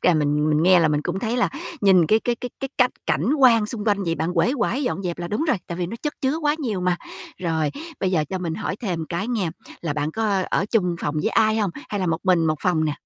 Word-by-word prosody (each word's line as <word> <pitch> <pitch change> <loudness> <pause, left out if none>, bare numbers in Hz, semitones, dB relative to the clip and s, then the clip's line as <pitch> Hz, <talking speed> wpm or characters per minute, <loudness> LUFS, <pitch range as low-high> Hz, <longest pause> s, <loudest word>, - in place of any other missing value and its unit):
à, 180 - +4
mình 150 0 +1
mình 150 +1 +2
nghe 180 0 +6
là 160 - +3
mình 150 -1 +1
cũng 175 +4 -2
thấy 230 +3 -1
là 245 - +2 0.3
nhìn 190 -5 +5
cái 215 +6 +3
cái 240 - +1
cái 245 +1 -7
cái 270 - -3
cách 250 -1 +5 0.2
cảnh 165 - +1
quan 230 -5 +5
xung 215 -2 -4
quanh 205 -2 +1
vậy, 165 -1 0
bạn 160 +2 -2
uể 170 +8 +3
oải 260 +2 0
dọn 245 -7 -2
dẹp 175 -2 -3
là 175 0 -4
đúng 210 - -1
rồi. 255 - +3
Tại 170 - -5
vì 175 - -1
nó 225 - -6
chất 300 - -1
chứa 275 +1 +1
quá 300 -2 +1
nhiều 225 -11 -2
mà. 180 -1 +1 0.4
Rồi, 160 -4 0 0.3
bây 190 - +1
giờ 165 -5 +2
cho 190 - -2
mình 170 -3 -3
hỏi 195 - -3
thêm 180 -8 -3
cái 185 +6 -3
nghe, 210 -9 -1 0.3
là 165 -4 -2
bạn 150 +1 -2
có 205 0 0
ở - - +1
chung 180 -7 +1
phòng 150 - -2
với - - +1
ai 220 -1 +3
hông? 210 -4 +1 0.2
Hay 205 - -2
là 185 - 0
một 165 -1 0
mình 180 -4 +3
một 155 0 +1
phòng 170 -4 +1
nè? 150 - 0
185 Hz, 280 wpm, -23 LUFS, 165-225 Hz, 0.4 s, nghe